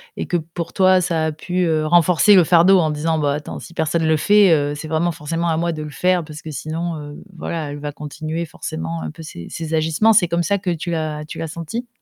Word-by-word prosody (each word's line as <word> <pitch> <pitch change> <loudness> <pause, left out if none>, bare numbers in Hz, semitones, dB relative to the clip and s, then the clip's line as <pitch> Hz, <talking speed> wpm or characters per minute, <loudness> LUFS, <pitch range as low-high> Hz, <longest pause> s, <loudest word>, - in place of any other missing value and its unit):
et - - -4
que, 175 - +1
pour 165 +1 -6
toi, 185 -1 +4
ça 165 -2 0
a 160 - 0
pu, 180 +4 -2
heu, 155 -2 +1
renforcer 175 +4 +5
le 175 -3 +6
fardeau 180 +3 +6
en 160 -3 +2
disant: 155 +2 -1
«Bah 145 -2 +1
attends, 150 +1 -6
si - - -12
personne 160 0 0
le 160 - +4
fait, 200 +4 +5
heu, 145 -1 +1
c'est 155 +2 -7
vraiment 160 +2 0
forcément 165 +1 -3
à 160 - +1
moi 170 +1 0
de 155 -1 -5
le 150 - -6
faire 180 +3 +1
parce 150 -1 -10
que 155 - -8
sinon, 160 +3 -4
heu, 145 -1 -8 0.2
voilà, 160 -2 -4
elle 145 - -7
va 145 0 -4
continuer 155 +3 -5
forcément 80 - -5
un 80 -1 -5
peu 160 - -11
ses 85 - -9
ses 160 -1 -5
agissements», 160 +8 +3
c'est 180 -5 +4
comme 170 0 +1
ça 200 +5 +1
que 190 -1 -4
tu 170 0 -3
l'as 155 -2 -3
tu 150 - -9
l'as 165 - -3
senti? 170 +10 -6
160 Hz, 255 wpm, -20 LUFS, 150-175 Hz, 0.2 s, le